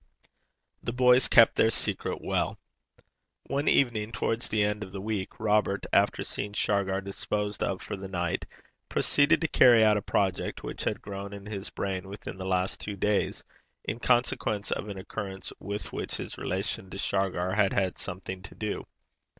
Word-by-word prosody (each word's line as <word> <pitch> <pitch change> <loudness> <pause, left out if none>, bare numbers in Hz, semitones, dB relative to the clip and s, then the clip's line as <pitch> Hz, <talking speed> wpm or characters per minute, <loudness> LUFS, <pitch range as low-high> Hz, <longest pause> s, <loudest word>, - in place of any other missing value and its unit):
The 120 - -3
boys 125 +1 +5
kept 115 -2 +7
their 110 - +4
secret - - -1
well. - - 0 0.9
One 140 +2 -1
evening, 115 -5 +3
towards 115 0 -1
the 110 -1 +2
end 105 0 0
of 95 - -9
the 95 - -5
week, 100 -1 -3
Robert, 105 -2 +2
after - - +3
seeing 100 0 -4
Shargar 100 -2 +1
disposed 105 +1 -2
of 95 -1 -1
for - - -4
the 95 0 -7
night, 90 -2 -2 0.4
proceeded 150 +4 +3
to 160 - +2
carry 120 -6 +7
out 105 -1 +5
a - - -1
project 95 -1 -1
which - - -5
had - - -1
grown 100 0 -6
in 100 0 -9
his 100 -2 -5
brain 95 -1 -3
within 100 -1 -7
the 95 - -4
last 95 0 0
two 105 - -4
days 105 +1 0 0.4
in 115 - -3
consequence 120 -4 +1
of 105 - -2
an 100 - -5
occurrence 95 0 -6
with 100 +2 -5
which - - -3
his - - -6
relation 95 0 -3
to 95 - -7
Shargar 95 -2 0
had 105 -1 +3
had 95 -3 0
something 95 0 -5
to 95 - -11
do. 105 -1 -4
100 Hz, 175 wpm, -28 LUFS, 95-110 Hz, 0.9 s, kept